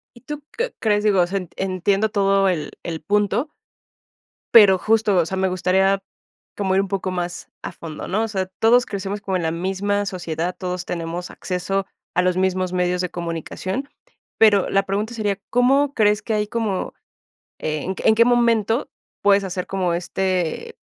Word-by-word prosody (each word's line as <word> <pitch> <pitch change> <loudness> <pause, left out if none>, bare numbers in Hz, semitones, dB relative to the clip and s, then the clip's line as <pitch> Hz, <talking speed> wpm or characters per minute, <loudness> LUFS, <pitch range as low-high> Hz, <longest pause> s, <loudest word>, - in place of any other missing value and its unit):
¿Y 240 - -16
tú 295 +1 -7
qué 485 +1 -1
crees? 210 -1 +1
Digo, 200 -4 +4
o 175 - +2
sea, 195 +2 -1
en 180 - -9
entiendo 195 +3 +1
todo 195 -1 +2
el 155 -5 -2
el 165 -2 -5
punto, 210 - +1 1.0
pero 200 -5 +8
justo, 215 -1 +2
o 170 -2 +3
sea, 190 - -3
me 190 0 +1
gustaría 190 +2 +2 0.5
como 190 -2 0
ir 195 - +4
un 195 - -2
poco 190 -1 -2
más 175 -1 -4
a - - -5
fondo, 155 -2 -8
¿no? 215 +4 +1
O - - -3
sea, 190 -3 -2
todos 245 +2 +5
crecemos 200 0 -4
como 195 -2 -2
en 170 - -1
la 160 - +1
misma 195 +3 -1
sociedad, 175 -1 -3
todos 180 -1 -3
tenemos 170 +1 -4
acceso 195 +1 -2 0.3
a 180 - +4
los 180 0 +1
mismos 185 -1 0
medios 180 0 0
de 180 - -2
comunicación. 175 - -4 0.5
Pero 205 -3 +5
la 195 0 +2
pregunta 210 +4 -2
sería, 205 -3 -1
¿Cómo 270 +3 +3
crees 210 -1 +3
que 220 - -2
hay 210 0 0
como? 210 -4 -2 0.7
Eh, 155 -1 -2
en 190 - -2
qué - - 0
en 220 - +6
qué 230 +1 +5
momento 235 -1 +2 0.3
puedes 200 -1 +4
hacer 180 -1 -4
como 185 -3 -1
este 185 - -2
195 Hz, 185 wpm, -22 LUFS, 180-210 Hz, 1.0 s, pero